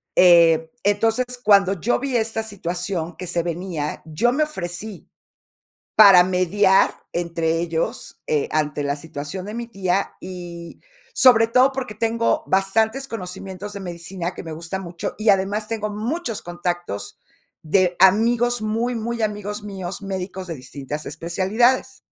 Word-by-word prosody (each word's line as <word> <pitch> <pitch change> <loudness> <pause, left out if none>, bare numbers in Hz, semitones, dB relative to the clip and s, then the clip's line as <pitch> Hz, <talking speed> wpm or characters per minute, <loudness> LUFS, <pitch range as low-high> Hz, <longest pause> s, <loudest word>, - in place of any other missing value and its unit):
Eh, 165 -3 +6
entonces, 225 +5 +2 0.2
cuando 195 -2 +4
yo 240 +8 +1
vi 265 -2 -3
esta 225 0 -1
situación 180 -4 -4
que 180 - -6
se 170 -1 -1
venía, 170 -3 -4
yo 165 +10 +1
me 305 +4 +2
ofrecí 190 - -6 0.9
para 195 -4 +9
mediar 185 +2 +3 0.2
entre 165 -1 -1
ellos, 165 -1 -3
eh, 150 -2 +1
ante 150 -1 -1
la 140 0 -1
situación 150 +4 -7
de 210 - -6
mi 235 0 -5
tía, 195 -3 -1
y 175 -2 -8 0.3
sobre 240 - +6
todo 255 +4 +4
porque 255 -5 -4
tengo 230 +8 0
bastantes 220 +7 +1
conocimientos 190 -2 -7
de 200 - -6
medicina, 175 0 -5
que - - -8
me 165 - -7
gusta 165 +4 -5
mucho, 175 -2 -5
y 215 +1 +1
además 200 +2 +2
tengo 215 -2 -3
muchos 230 - -3
contactos 175 - -4 0.4
de 180 +2 +2
amigos, 235 +5 +4
muy, 225 +3 -1
muy 230 +1 -3
amigos 210 0 -3
míos, 195 -2 -6
médicos 190 -1 -5
de 165 - -4
distintas 140 +2 -7
especialidades. 205 - 0
190 Hz, 140 wpm, -22 LUFS, 170-220 Hz, 0.9 s, para